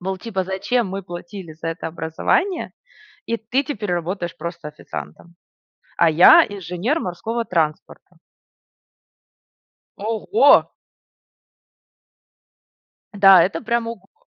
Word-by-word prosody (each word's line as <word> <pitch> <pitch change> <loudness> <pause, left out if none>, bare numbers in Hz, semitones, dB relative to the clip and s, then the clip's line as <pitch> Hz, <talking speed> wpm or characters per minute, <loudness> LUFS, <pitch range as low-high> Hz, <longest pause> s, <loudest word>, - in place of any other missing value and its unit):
Мол, 190 +1 -3
типа, 195 -2 -3
зачем 195 +4 -1
мы 195 +1 -5
платили 175 0 -9
за 160 +1 -6
это 165 +1 -5
образование, 170 - -1 0.6
и 230 - -1
ты 230 +5 -1
теперь 215 -9 -4
работаешь 175 0 -3
просто 170 -2 -7
официантом, 150 - -10 0.6
а 170 -1 +4
я 160 +3 +7
инженер 200 - -3
морского 230 - -4
транспорта. 160 -5 -3 1.8
Ого! 225 - +3 2.5
Да, 195 -3 +7
это 185 - -1
прям 235 0 -1
ого-го! 230 - -11
190 Hz, 100 wpm, -21 LUFS, 170-230 Hz, 2.5 s, я